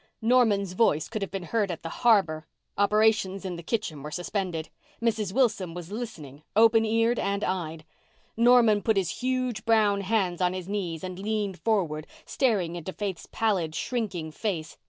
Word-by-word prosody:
Norman's 220 Hz, -6 st, +3 dB
voice 160 Hz, -7 st, +2 dB
could 215 Hz, -2 st, -5 dB
have 195 Hz, -, -2 dB
been 195 Hz, -2 st, -5 dB
heard 205 Hz, +3 st, 0 dB
at 170 Hz, -, -5 dB
the 165 Hz, -, -7 dB
harbour. 165 Hz, -10 st, +3 dB, 0.3 s
Operations 205 Hz, -2 st, +2 dB
in 180 Hz, -2 st, -3 dB
the 170 Hz, -, -7 dB
kitchen 170 Hz, -5 st, -3 dB
were 150 Hz, -, -6 dB
suspended. 175 Hz, -1 st, -3 dB, 0.3 s
Mrs. 220 Hz, -4 st, 0 dB
Wilson 205 Hz, -8 st, +1 dB
was 175 Hz, +1 st, -8 dB
listening 160 Hz, -, -7 dB
open 225 Hz, +1 st, +5 dB
eared 230 Hz, +2 st, +2 dB
and 200 Hz, +1 st, -1 dB
eyed. 165 Hz, -4 st, -3 dB, 0.5 s
Norman 235 Hz, -3 st, +5 dB
put 220 Hz, -1 st, +1 dB
his 190 Hz, +3 st, -1 dB
huge 255 Hz, -4 st, -1 dB
brown 215 Hz, -3 st, +3 dB
hands 190 Hz, -3 st, 0 dB
on 180 Hz, 0 st, +2 dB
his 185 Hz, -1 st, -6 dB
knees 185 Hz, -5 st, -3 dB
and 185 Hz, 0 st, -6 dB
leaned 205 Hz, -2 st, -2 dB
forward, 170 Hz, -9 st, 0 dB, 0.2 s
staring 195 Hz, -10 st, 0 dB
into 175 Hz, +2 st, -5 dB
Faith's 195 Hz, -3 st, -5 dB
pallid, 185 Hz, -8 st, 0 dB
shrinking 195 Hz, -10 st, -3 dB
face. 160 Hz, -4 st, -3 dB
200 Hz, 165 wpm, -27 LUFS, 175-220 Hz, 0.5 s, open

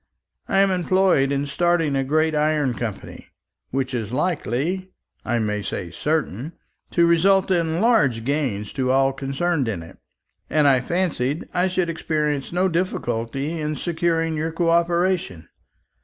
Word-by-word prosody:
I -, -, 0 dB
am 195 Hz, -1 st, +3 dB
employed 180 Hz, -6 st, +2 dB
in 140 Hz, 0 st, 0 dB
starting 165 Hz, 0 st, +1 dB
a 135 Hz, -, +1 dB
great 155 Hz, +3 st, +1 dB
iron 150 Hz, -3 st, +1 dB
company, 115 Hz, -3 st, -6 dB, 0.4 s
which 130 Hz, 0 st, -2 dB
is 115 Hz, -4 st, -3 dB
likely 165 Hz, -, -1 dB, 0.3 s
I 120 Hz, -, 0 dB
may 105 Hz, -2 st, -1 dB
say 90 Hz, -3 st, -5 dB
certain 150 Hz, -, -2 dB, 0.4 s
to 170 Hz, -, +3 dB
result 190 Hz, +3 st, +3 dB
in 165 Hz, -1 st, +1 dB
large 205 Hz, -, +3 dB
gains 125 Hz, -7 st, -2 dB
to 130 Hz, -2 st, -1 dB
all 135 Hz, +1 st, +3 dB
concerned 135 Hz, +2 st, -1 dB
in 95 Hz, -7 st, -3 dB
it; 80 Hz, -, -14 dB, 0.5 s
and 150 Hz, -2 st, +3 dB
I 130 Hz, -2 st, +4 dB
fancied 155 Hz, -3 st, -1 dB
I 180 Hz, +1 st, +2 dB
should 185 Hz, -1 st, 0 dB
experience 150 Hz, -4 st, -2 dB
no 180 Hz, +2 st, +2 dB
difficulty 145 Hz, -4 st, -2 dB
in 150 Hz, 0 st, -2 dB
securing 165 Hz, -1 st, 0 dB
your 160 Hz, +1 st, -2 dB
co 165 Hz, +1 st, 0 dB
operation. 170 Hz, -, +1 dB
155 Hz, 145 wpm, -22 LUFS, 130-175 Hz, 0.5 s, I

